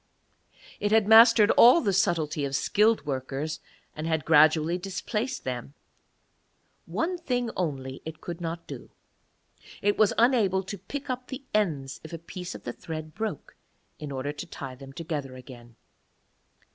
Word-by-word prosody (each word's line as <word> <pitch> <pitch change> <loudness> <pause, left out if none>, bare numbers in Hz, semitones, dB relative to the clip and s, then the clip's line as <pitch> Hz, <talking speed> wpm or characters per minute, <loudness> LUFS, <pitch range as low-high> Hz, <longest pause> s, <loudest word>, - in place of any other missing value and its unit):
It 205 0 -1
had 220 -2 +4
mastered 220 -1 +8
all 245 +8 +7
the 200 -10 0
subtlety 160 -6 +1
of 140 -1 -2
skilled 215 +8 +2
workers, 140 +2 -3 0.4
and 155 +1 -4
had 160 -1 -1
gradually 160 +2 +4
displaced 210 +6 -3
them; 130 +2 -5 1.1
one 355 +2 -2
thing 245 -7 -1
only 135 -6 -3
it 160 0 -8
could 175 0 -7
not 165 0 -4
do, - - -9 0.9
it 205 0 0
was 215 -2 +5
unable 225 -6 +3
to 195 +1 -7
pick 280 +10 -7
up 255 0 -5
the 265 +1 -7
ends 150 -10 -1
if 160 - -10
a - - -3
piece 175 +2 -8
of - - -10
the 120 - -5
thread 155 -3 -7
broke, 215 -5 -5 0.4
in 150 -2 -6
order 135 +1 -3
to 150 - -7
tie 135 -2 -7
them 135 +1 -12
together 145 -4 -5
again. 120 -2 -13
165 Hz, 155 wpm, -27 LUFS, 145-210 Hz, 1.1 s, mastered